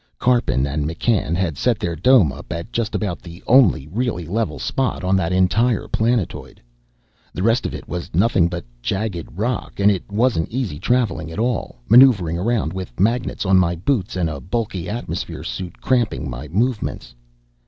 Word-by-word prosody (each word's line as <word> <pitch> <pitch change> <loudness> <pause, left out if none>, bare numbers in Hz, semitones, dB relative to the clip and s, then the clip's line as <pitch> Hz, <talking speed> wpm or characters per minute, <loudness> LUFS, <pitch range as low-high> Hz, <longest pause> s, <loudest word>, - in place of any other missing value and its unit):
Karpin 120 - +2
and 70 +1 -2
McCann 85 0 0
had 85 -5 -1
set 120 -3 +2
their 85 -5 -3
dome 95 - +5
up 70 - -10
at 85 +6 -5
just 115 -2 -1
about 100 -5 -2
the 85 +1 -12
only 115 - +4
really 100 -1 -2
level 85 -4 -2
spot 130 - -2
on 95 +1 +2
that 90 -3 0
entire 95 +6 +2
planetoid. 115 -4 -1 0.8
The 90 - -2
rest 115 +3 +2
of - - -6
it - - -9
was 90 0 -5
nothing 95 -1 +3
but 85 -3 -5 0.2
jagged 95 - -2
rock, 120 +3 -2
and 100 +1 +5
it 95 0 -4
wasn't 110 -6 +1
easy 115 - -3
traveling 115 -6 0
at 80 - -8
all, 115 - -2
maneuvering 105 -8 +6
around 105 -5 0
with 95 -2 -7
magnets 115 +2 0
on 95 0 +4
my 85 -1 +1
boots 95 - -1
and 90 -3 0
a 75 -3 -5
bulky 95 -4 -3
atmosphere 120 +3 -4
suit 85 +9 -6
cramping 120 - 0
my 65 +3 -6
movements. 110 - -2
95 Hz, 175 wpm, -21 LUFS, 85-115 Hz, 0.8 s, maneuvering